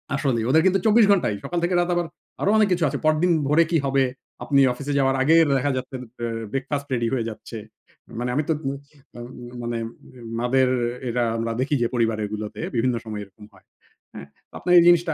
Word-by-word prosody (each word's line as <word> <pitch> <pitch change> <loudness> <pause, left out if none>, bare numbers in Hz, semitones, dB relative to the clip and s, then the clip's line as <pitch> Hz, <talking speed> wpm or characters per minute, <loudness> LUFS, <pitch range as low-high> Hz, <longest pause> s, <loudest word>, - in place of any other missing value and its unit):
আসলেই 130 -5 0
ওদের 160 +4 +5
কিন্তু 190 +1 +3
২৪ 220 +1 +6
ঘণ্টায় 175 - +2
সকাল 175 0 -2
থেকে 175 +1 +1
রাত 175 0 +1
আবার 175 -1 -1 0.3
আরো 200 - +1
অনেক 215 -1 +4
কিছু 175 - -1
আছে। - - -3
পরদিন 155 +3 +3 0.2
ভোরে 155 +4 +4
কি 165 - +3
হবে? 135 0 +2 0.4
আপনি 140 -1 +3
অফিসে 140 +3 -5
যাওয়ার 135 0 +2
আগের 160 +3 +5
দেখা 140 +2 0
যাচ্ছে 130 +1 -6 0.2
বে 120 - -4 0.3
ব্রেকফাস্ট 140 +1 -3
রেডি 115 -1 0
হয়ে 115 -3 -1
যাচ্ছে। 110 +1 -9 0.6
মানে 125 +1 -2
আমি 150 - +1
তো - - +4
বুঝ 135 0 -3 0.4
আ - - -8
ওম 120 +2 -9 0.3
মানে 120 0 -3 0.6
মাদের 130 +2 +2 0.4
এরা 120 +1 0
আমরা 115 0 -2
দেখি 140 +3 0
যে 120 - +2
পরিবারেরগুলোতে 110 -2 -2
বিভিন্ন 120 +1 +1
সময় 105 -2 -5
এরকম 105 +2 -15
হয়। - - -22 0.5
হ্যাঁ? 70 - -9 0.2
তো - - -42
আপনার 180 - +1
এই - - +5
জিনিসটা 175 -2 +4
135 Hz, 200 wpm, -23 LUFS, 115-165 Hz, 0.6 s, ২৪